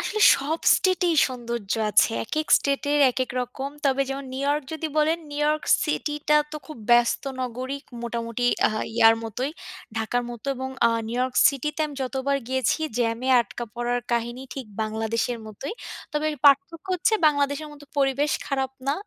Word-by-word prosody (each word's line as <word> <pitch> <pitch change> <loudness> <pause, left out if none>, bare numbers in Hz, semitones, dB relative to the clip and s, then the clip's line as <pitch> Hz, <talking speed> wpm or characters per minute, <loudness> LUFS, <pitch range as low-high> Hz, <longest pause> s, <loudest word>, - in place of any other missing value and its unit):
আসলে 430 - -2 0.2
সব 300 +4 -2 0.2
state 370 -1 +1
এই - - +2
সৌন্দর্য 235 -5 -4 0.2
আছে। - - +5
একেক 310 - -2
স্টেট-এর 285 +1 0
একেক 255 +1 -2
রকম। 265 +3 -5
তবে 275 -1 +2
যেমন, 275 +1 -4
নিউ 260 - -4
ইয়র্ক 290 +1 +1
যদি 320 0 -3
বলেন, 310 +2 +3
নিউ 290 0 -4
ইয়র্ক 300 +1 +1 0.2
সিটি-টা 300 0 0
তো 305 - -5
খুব 310 -5 -9
ব্যস্ত 240 0 +4 0.2
নগরী। 255 +2 -4 0.2
মোটামুটি 235 0 -3 0.2
আ - - 0 0.3
ইয়ার 225 -1 +7
মতোই, 245 +5 -3 0.5
ঢাকার 225 +2 0
মতো 240 +2 -9
এবং 260 +1 -4 0.2
আ - - +5 0.2
নিউ 235 - -3
ইয়র্ক 255 0 -1
সিটি-তে 295 +2 -3
আমি 295 - -9
যতবার 265 +2 -1
গিয়েছি, 260 0 +1 0.2
জ্যামে 235 +2 0
আটকা 235 +1 -5
পড়ার 240 0 -1
কাহিনী 240 +2 -2
ঠিক 265 -3 -6 0.2
বাংলাদেশের 225 +2 -2
মতোই। 215 +6 -6 0.4
তবে 300 +1 0 0.2
পার্থক্য 285 +5 +4
হচ্ছে, 365 +5 +2
বাংলাদেশের 285 0 +1
মতো 290 0 -13
পরিবেশ 275 +1 +2
খারাপ 270 -2 -1 0.2
না। 275 - +3
265 Hz, 165 wpm, -25 LUFS, 240-295 Hz, 0.5 s, ইয়ার